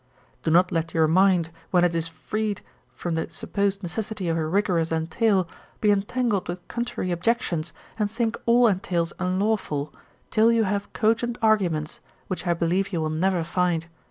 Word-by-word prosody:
Do - - -1
not 180 +3 +4
let 165 0 -2
your 160 -1 +4
mind, 180 -1 +3 0.2
when 180 -1 +3
it 175 -1 +3
is 165 -1 +1
freed 205 +6 -3 0.3
from 175 - -3
the 160 - -2
supposed 200 0 -1
necessity 195 +1 -3
of 165 - +1
a 160 -1 -1
rigorous 175 -2 +1
entail, 180 +4 +1 0.3
be 210 - +3
entangled 205 0 0
with 175 +1 -6
contrary 235 -6 -3
objections, 175 -3 0 0.3
and 210 -1 +1
think 230 +1 -1
all 240 +1 +6
entails 180 -5 0
unlawful, 185 -6 -1 0.4
till 225 +1 +5
you 230 -1 +3
have 200 0 -2
cogent 235 +1 +1
arguments, 180 -9 +1 0.3
which 185 0 -3
I 170 - +2
believe 175 +4 0
you 175 - -1
will 155 -1 -1
never 175 +2 +1
find. 175 -1 0
185 Hz, 165 wpm, -25 LUFS, 165-215 Hz, 0.4 s, all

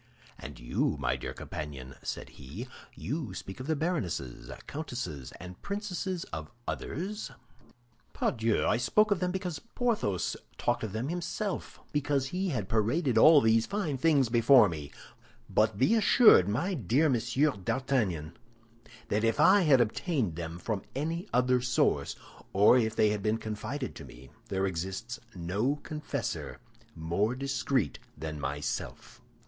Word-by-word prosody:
"And - - -9
you, - - 0
my 65 - 0
dear 65 - -5
companion," 70 -4 -7
said - - -5
he, 75 - -9 0.3
"you 140 - -4
speak 95 +2 -7
of 130 - -6
the 160 - +1
baronesses, 110 - -3 0.2
countesses, 105 - -5
and 90 +1 -10
princesses 190 -3 -3
of 80 0 -5 0.2
others?" 200 +7 -4 0.8
"Pardieu! 110 -2 0
I - - +3
spoke 210 - +3
of 200 - +3
them 180 0 0
because 180 -4 -3
Porthos 225 - -1 0.2
talked 120 - 0
of 105 -3 -4
them 115 +6 -2
himself, 180 +4 -3
because 145 -2 0
he 185 +3 -1
had 110 - -2
paraded 120 - +1
all 155 +3 +8
these 110 -1 +3
fine 200 -8 -1
things 145 -4 +4
before 120 0 +6
me. 75 -5 -6 0.6
But 110 -1 +2
be 130 - +4
assured, 215 - +6
my 155 - 0
dear 135 - +2
Monsieur 130 +3 +2
d'Artagnan, 95 - -1 0.7
that 105 +2 +1
if 115 +5 +1
I 190 +7 +7
had 145 -7 +5
obtained 120 - 0
them 85 0 -5
from 100 +2 -3
any 165 +7 -2
other 125 0 +3
source, 125 -1 +1 0.4
or 100 +5 +6
if 110 -3 +2
they 105 - +4
had 105 -1 -2
been 105 +2 +1
confided 115 +5 -4
to - - -9
me, 65 +2 -14 0.2
there 95 0 0
exists 95 +7 -4 0.2
no 100 +11 0
confessor 150 -1 -4 0.4
more 85 +9 0
discreet 135 -3 -1 0.2
than 75 0 -5
myself." 70 +2 -4
120 Hz, 145 wpm, -30 LUFS, 95-155 Hz, 0.8 s, all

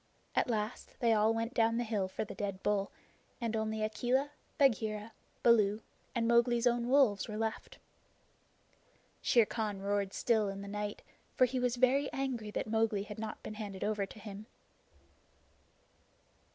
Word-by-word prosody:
At - - +2
last 215 0 -3
they 230 -2 +4
all 215 +1 +4
went 230 +2 -2
down 230 -1 +3
the 240 - +1
hill 215 -4 -1
for 185 - -4
the - - -8
dead 200 -2 -4
bull, 200 -1 +1 0.5
and 230 -2 -2
only 220 0 -1
Akela, 250 +6 0 0.3
Bagheera, 220 -5 +2 0.3
Baloo, 215 -2 +4 0.3
and 230 -1 +1
Mowgli's 235 0 +4
own 240 0 +2
wolves 260 -7 +4
were 215 -1 -5
left. 220 0 -3 1.4
Shere 235 -3 +5
Khan 210 -3 -3
roared 200 0 -1
still 220 -4 +2
in 195 0 -6
the - - -8
night, 210 0 -4 0.3
for 255 - +6
he 255 +1 -2
was 250 -1 +1
very 260 +3 +3
angry 260 -5 -2
that - - -2
Mowgli 220 -2 +1
had 210 0 -8
not 220 -1 -6
been - - -6
handed 205 -3 -6
over 210 -2 0
to - - -13
him. 210 0 -9
220 Hz, 160 wpm, -33 LUFS, 210-235 Hz, 1.4 s, for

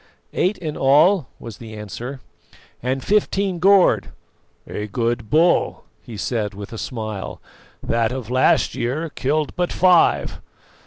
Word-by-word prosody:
"Eight 190 +3 +1
in 155 -4 -5
all," 150 - +4
was 115 -3 -9
the 110 -2 -9
answer, 120 +6 -7 0.6
"and 130 +2 -2
fifteen 195 -3 +1
gored." 195 +1 +4 0.6
"A 105 - -5
good 115 +1 -2
bull," 165 +3 +2 0.2
he 115 - -10
said 105 -2 -2
with 100 +2 -8
a - - -6
smile; 110 -5 -5 0.4
"that 115 0 0
of 125 -3 -5
last 130 +1 +3
year 150 +7 -3
killed 150 +2 -1
but 180 -1 -1
five. 180 -2 +3
130 Hz, 135 wpm, -21 LUFS, 115-170 Hz, 0.6 s, all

